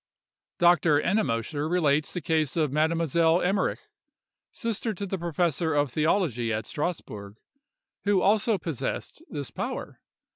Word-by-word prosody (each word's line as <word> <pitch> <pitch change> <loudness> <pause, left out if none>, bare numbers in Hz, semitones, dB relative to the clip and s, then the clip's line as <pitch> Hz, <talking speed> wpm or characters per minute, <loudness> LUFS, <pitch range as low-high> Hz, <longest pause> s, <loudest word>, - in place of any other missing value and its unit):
Dr. 170 -3 +4
Ennemoser 150 - 0
relates 155 -4 +2
the 175 - -4
case 155 -1 0
of 155 -4 +1
a - - -7
Mademoiselle 165 +1 +2
Emmerich, 190 +2 0 0.7
sister 225 -2 -2
to 200 - -4
the 195 -1 -3
professor 170 -1 0
of 145 -3 +1
theology 150 - +1
at 110 0 -2
Strasburg, 105 - -4 0.7
who 200 -1 +3
also 215 +2 +3
possessed 160 -8 -4
this 140 -3 -5
power. - - -5
160 Hz, 125 wpm, -27 LUFS, 145-180 Hz, 0.7 s, Dr